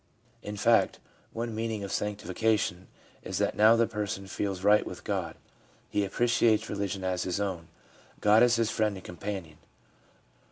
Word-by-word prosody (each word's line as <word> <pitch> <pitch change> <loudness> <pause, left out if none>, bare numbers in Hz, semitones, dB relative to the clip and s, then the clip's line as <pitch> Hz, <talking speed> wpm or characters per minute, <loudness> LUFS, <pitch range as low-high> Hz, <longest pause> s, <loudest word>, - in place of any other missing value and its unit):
In 105 0 -6
fact, 115 +2 +3 0.3
one 115 0 -4
meaning 110 -1 -3
of 100 - -5
sanctification 105 -2 -1 0.3
is - - -4
that - - 0
now 110 +2 +6
the 115 0 +3
person 105 -3 -4
feels 95 -1 -3
right 105 +1 +5
with - - -8
God, - - -3 0.6
he 105 - +1
appreciates 115 +1 +2
religion 100 -1 -3
as 90 -1 -1
his 90 +1 -2
own, 95 -5 -3 0.5
God 105 +2 +5
is 120 -1 +5
his 115 -1 +1
friend 105 -2 0
and 95 - -12
companion. 90 -3 -6
105 Hz, 155 wpm, -29 LUFS, 95-110 Hz, 0.6 s, now